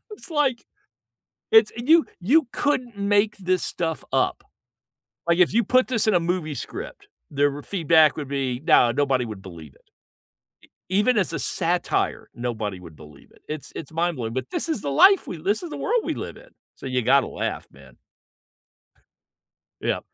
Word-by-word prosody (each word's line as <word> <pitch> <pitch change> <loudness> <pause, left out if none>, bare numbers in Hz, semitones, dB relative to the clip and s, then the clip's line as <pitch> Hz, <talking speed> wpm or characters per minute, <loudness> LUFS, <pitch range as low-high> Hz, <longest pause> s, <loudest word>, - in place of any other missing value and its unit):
It's, 415 -3 -12
like, 285 -6 0 0.9
it's 445 0 +6
you 310 +8 +4 0.2
you 275 - +3
couldn't 250 -6 -1
make 205 +1 +2
this 185 -2 0
stuff 160 -2 -3
up. - - +1 0.8
Like, 170 +1 +2
if 180 - +4
you 235 - +3
put 255 +3 +3
this 230 -4 0
in 215 - +4
a - - +5
movie 165 -3 -2
script, 115 -4 -8 0.2
the 145 0 0
feedback 160 -5 +4
would 145 - -5
be, 135 -3 -2
no, 125 -7 +5
nobody 135 -1 +1
would 105 -4 -8
believe 85 -6 -11
it. - - -26 1.1
E 190 - +2
even 245 +4 +3
as 190 - 0
a - - -2
satire, 175 0 -1
nobody 110 -5 -4
would 85 -3 -13
believe 75 -2 -16
it. - - -24
It's 150 -2 -7
it's 140 - -8
mind-blowing, 160 -9 -2
but, 130 -1 -4
this - - -3
is 315 -10 -2
the 140 - -2
life 390 - +5
we - - -5
li 155 - -15
this 205 - 0
is 335 - -7
the - - -6
world 475 -2 0
we - - -2
live - - -7
in, - - -17 0.3
so - - -10
you 130 -1 0
gotta 135 +3 +3
laugh, - - -4
man. 65 -2 -17 1.9
Yeah. - - 0
165 Hz, 180 wpm, -24 LUFS, -, 1.9 s, it's